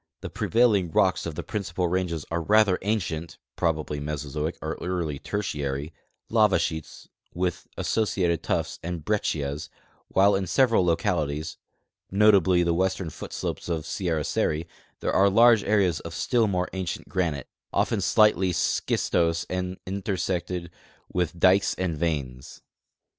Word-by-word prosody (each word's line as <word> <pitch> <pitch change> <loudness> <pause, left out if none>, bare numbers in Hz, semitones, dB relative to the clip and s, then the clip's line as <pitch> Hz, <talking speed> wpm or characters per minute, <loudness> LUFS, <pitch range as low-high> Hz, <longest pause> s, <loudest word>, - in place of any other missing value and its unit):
The - - -6
prevailing 110 -6 +2
rocks 90 +2 +2
of 80 - -5
the - - -4
principal 95 -5 -2
ranges 85 -3 -1
are 85 0 0
rather 105 +1 +4
ancient 85 -6 -2 0.2
(probably 80 -3 -1
Meso 75 -1 -4
zoic 75 +3 -2
or 80 +1 -3
early 85 -6 -2
Tertiary) 75 -7 -3 0.3
lava 110 -3 +4
sheets 80 -2 -4 0.3
with 90 0 -2
associated 90 -6 0
tuff's - - -2
and 85 -2 -5
brec 105 -1 +1
cias, 75 +1 -3 0.4
while 100 +2 +4
in 95 -1 -1
several 115 +2 +3
localities, 75 -3 -1 0.5
notably 95 -3 +4
the 85 0 +1
western 95 -1 -1
foot - - -9
slopes - - -4
of 80 -2 -2
Sierra 85 -4 -1
Seri, 80 +3 -1 0.3
there - - -1
are 100 +1 +5
large 115 +1 +6
areas 100 -6 +2
of - - -8
still 115 -3 +2
more 90 -2 0
ancient 95 -2 -4
granite, 80 -8 -2 0.2
often 110 - +1
slightly 95 -1 +4
schistose 85 0 0
and 90 0 -2
intersected 95 -3 -3 0.4
with 90 -1 -1
dikes 95 +3 +4
and 90 -3 -2
veins. 70 -5 -4
90 Hz, 140 wpm, -26 LUFS, 80-100 Hz, 0.5 s, large